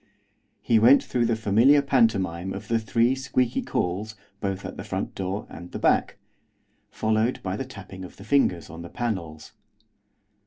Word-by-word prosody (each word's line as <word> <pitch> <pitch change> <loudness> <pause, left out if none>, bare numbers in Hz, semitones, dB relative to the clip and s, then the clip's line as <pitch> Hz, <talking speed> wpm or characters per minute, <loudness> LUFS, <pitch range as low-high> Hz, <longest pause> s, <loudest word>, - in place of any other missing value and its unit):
He 115 -2 +4
went 125 +6 +6
through 120 -2 0
the 115 - +1
familiar 115 +7 +4
pantomime 100 -9 +1
of 105 - -8
the 115 0 +2
three 115 +3 +2
squeaky 130 -2 0
calls 100 +5 -2 0.2
both 100 -1 -3
at - - -6
the - - -7
front - - -4
door 95 +2 -3
and 85 +1 -10
the - - -5
back, - - +2 0.7
followed 110 +3 0
by 95 -1 -2
the 135 - -4
tapping 100 -6 -10
of 90 - -11
the 100 - -11
fingers 105 - +1
on 80 +1 -9
the 85 - -8
panels. 85 -10 -4
110 Hz, 165 wpm, -25 LUFS, 95-120 Hz, 0.7 s, went